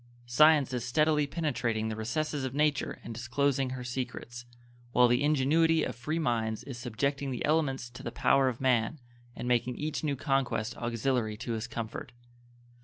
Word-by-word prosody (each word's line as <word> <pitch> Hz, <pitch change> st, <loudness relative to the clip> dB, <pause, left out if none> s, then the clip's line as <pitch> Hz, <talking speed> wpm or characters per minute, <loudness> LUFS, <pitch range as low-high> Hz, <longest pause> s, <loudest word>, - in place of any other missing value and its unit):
Science 145 Hz, +2 st, +5 dB
is 125 Hz, -2 st, -2 dB
steadily 150 Hz, +2 st, +2 dB
penetrating 120 Hz, -8 st, -1 dB
the 110 Hz, -, -3 dB
recesses 140 Hz, +6 st, -2 dB
of 130 Hz, 0 st, -3 dB
nature 150 Hz, -1 st, +1 dB
and 115 Hz, -, -6 dB
disclosing 130 Hz, +3 st, 0 dB
her 130 Hz, -1 st, -5 dB
secrets, 120 Hz, -1 st, -5 dB, 0.5 s
while 125 Hz, 0 st, +6 dB
the 120 Hz, +2 st, +2 dB
ingenuity 155 Hz, +3 st, +3 dB
of -, -, -3 dB
free 150 Hz, +7 st, -3 dB
minds 115 Hz, -7 st, -1 dB
is 135 Hz, -, -7 dB
subjecting 140 Hz, +4 st, -2 dB
the 125 Hz, -, -2 dB
elements 145 Hz, -5 st, +1 dB
to 120 Hz, -1 st, -11 dB
the -, -, -5 dB
power 135 Hz, -1 st, +3 dB
of 120 Hz, -, -5 dB
man 130 Hz, +3 st, +1 dB, 0.4 s
and -, -, -5 dB
making 125 Hz, 0 st, +1 dB
each 155 Hz, +3 st, -3 dB
new 145 Hz, -2 st, 0 dB
conquest 130 Hz, -5 st, -1 dB
auxiliary 120 Hz, -2 st, -1 dB
to 120 Hz, +1 st, -5 dB
his 115 Hz, +1 st, -3 dB
comfort. 115 Hz, +3 st, -6 dB
130 Hz, 170 wpm, -30 LUFS, 120-145 Hz, 0.5 s, while